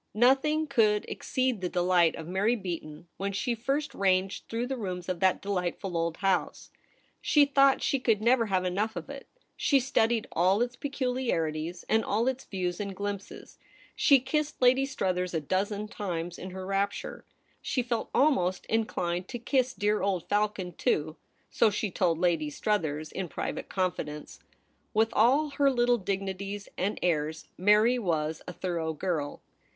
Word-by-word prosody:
Nothing 270 +7 +3
could 215 -7 +2
exceed 255 -5 -1
the 180 - -1
dehght 175 -2 +3
of 160 -1 -7
Mary 200 +6 +1
Beaton 170 -6 -6
when 200 +1 -2
she 235 +5 -1
first 275 +5 -2
ranged 190 -2 0
through 230 +1 -2
the 265 +1 -3
rooms 185 -6 -5
of 185 -2 -2
that 190 0 +2
deh'ghtful 190 -1 -2
old 165 -1 -1
house. 195 -2 -1 0.5
She 295 -2 +5
thought 275 -1 +4
she 275 - +1
could 225 -4 +2
never 235 +1 +3
have 185 -2 0
enough 205 +5 -1
of 275 - -6
it. 275 -1 -9 0.3
She 280 - +3
studied 235 -4 +1
all 190 +6 +3
its 245 +1 -4
peculiarities, 185 - -2
and 220 0 +2
all 220 +4 0
its 265 0 -2
views 180 -3 -3
and 200 -2 -4
glimpses. 200 0 -6 0.4
She 280 -3 +5
kissed 295 +4 -2
Lady 260 +2 +4
Struthers 180 -9 -1
a - - +2
dozen 200 +7 -1
times 175 -5 -4
in 185 - -6
her 185 0 -7
rapture; 195 +1 -2 0.4
she 250 - -1
felt 235 -2 -2
almost 190 -11 +2
inclined 180 -5 -1
to 245 - -5
kiss 255 +2 +1
dear 210 +1 +1
old 190 -4 -1
Falcon 205 -3 0
too, 155 0 0 0.4
so 230 - +4
she 205 0 -2
told 170 -2 +1
Lady 165 -3 +1
Struthers 155 -4 -1
in 190 -2 -4
private - - -4
confidence. 160 -5 -3 0.6
With 220 +1 +4
all 270 +8 +4
her 280 -1 +5
little 245 -2 +2
dignities 195 +1 -4
and 195 +3 -1
airs, 160 -2 -1
Mary 210 +6 +4
was 160 -6 -1
a - - -4
thorough 170 -4 -2
girl. 155 -3 -3
200 Hz, 160 wpm, -28 LUFS, 180-240 Hz, 0.6 s, She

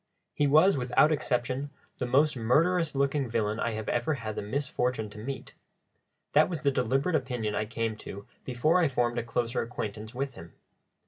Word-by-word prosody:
He 145 - +2
was, 155 +5 +5
without 125 +4 +3
exception, 130 -1 -1 0.3
the 125 - -1
most 145 +4 +3
murderous 155 +8 +2
looking 140 -1 +1
villain 110 -1 0
I 115 - -1
have 110 -1 -5
ever 120 +6 0
had 110 -4 -5
the - - -3
misfortune 125 -1 -2
to 105 - -10
meet: 130 +4 -6 0.8
that 155 +3 +5
was 170 -3 -4
the 140 -2 +3
deliberate 135 +7 +1
opinion 125 -7 -1
I 110 - -1
came 115 0 -2
to 100 -1 -9 0.2
before 145 +8 +2
I 170 - +4
formed 120 -2 0
a - - -3
closer 120 +1 -1
acquaintance 110 -1 -5
with 135 +1 -2
him. 85 -4 -12
125 Hz, 180 wpm, -29 LUFS, 115-145 Hz, 0.8 s, was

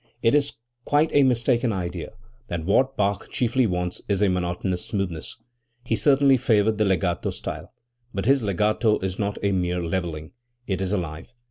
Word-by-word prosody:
It 115 - +4
is 145 -1 +2 0.3
quite 150 +4 +2
a 145 - +6
mistaken 125 -2 +2
idea 90 -2 -4 0.3
that 85 -2 -4
what 130 +8 +2
Bach 100 0 0
chiefly 125 0 +1
wants 90 -1 -2
is 100 0 +2
a 100 - +4
monotonous 90 0 -1
smoothness. 95 -4 -4 0.5
He 115 - 0
certainly 140 0 +4
favored 110 -2 +2
the 105 - +3
legato 90 -2 0
style. 80 +4 -6 0.4
But 100 -2 -3
his 135 +2 +4
legato 105 +2 +1
is 95 0 -3
not 100 -1 -1
a 100 - +2
mere 90 -2 0
levelling; 80 -3 -3 0.3
it 95 -3 -2
is 95 -1 -1
alive. 85 +3 -4
100 Hz, 165 wpm, -24 LUFS, 90-120 Hz, 0.5 s, a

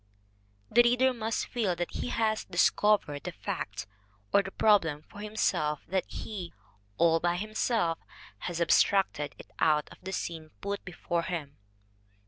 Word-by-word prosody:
The 240 - +7
reader 250 +2 +4
must 225 -2 -2
feel 215 -8 0
that 175 0 -3
he - - -3
has 220 -2 +1
discovered 185 -4 +2
the - - -4
fact - - -4 0.5
or 200 - +7
the 195 - -6
prob 210 0 +5
lem 150 -2 -4
for 205 - -13
himself, 180 -8 0
that 190 -1 0
he, 185 -6 -6 0.4
all 165 -1 +4
by 175 +1 +1
himself, 215 -3 0 0.4
has 175 -1 -4
abstracted 170 -2 +3
it - - -13
out 150 -2 +3
of - - -14
the 190 +1 -6
scenes 165 -4 -4
put 200 0 -3
before 175 -1 -2
him. 155 -5 -5
185 Hz, 150 wpm, -30 LUFS, 165-215 Hz, 0.5 s, The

